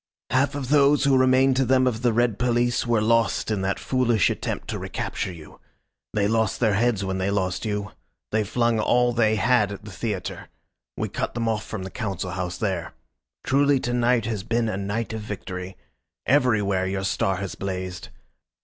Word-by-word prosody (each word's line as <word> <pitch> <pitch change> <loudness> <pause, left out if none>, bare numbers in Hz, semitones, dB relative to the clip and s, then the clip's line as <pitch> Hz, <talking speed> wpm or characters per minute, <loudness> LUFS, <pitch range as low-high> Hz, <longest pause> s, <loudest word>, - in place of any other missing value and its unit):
"Half 135 +2 +2
of 135 -3 -4
those 145 0 +4
who 140 -2 +4
remain 130 +1 +4
to 130 +1 +2
them 130 0 +3
of 120 -3 0
the 120 -1 +3
red 115 -2 +1
police 120 0 +1
were 115 -3 +2
lost 115 -1 +2
in 105 -3 0
that 95 0 -1
foolish 120 -5 +2
attempt - - -4
to - - -3
recapture - - -4
you. 80 -3 -13 0.6
They 100 -1 +2
lost 110 -1 +1
their 110 -4 +3
heads 105 -1 +1
when 95 0 -2
they 95 +1 0
lost 95 0 -1
you. 105 -1 -3 0.4
They 110 0 +2
flung 115 +2 +1
all 120 +2 +3
they 110 -2 +3
had 110 -1 +2
at 100 0 -8
the 105 - -8
theatre. 100 -1 -4 0.5
We - - -1
cut - - -4
them 115 -1 -1
off 110 -1 0
from 100 -4 -5
the 95 - -7
Council 95 -6 -4
House 90 -1 -3
there. 90 -6 -3 0.5
Truly 140 0 +3
to 120 - -2
night 120 -1 +2
has 110 -3 -2
been 115 +4 0
a 110 - -2
night 105 +4 -3
of 110 - -4
victory. 95 -3 -6 0.5
Everywhere 105 -8 +2
your 95 0 -2
star 95 0 0
has 95 0 -4
blazed. 95 -1 -5
110 Hz, 190 wpm, -24 LUFS, 95-120 Hz, 0.6 s, those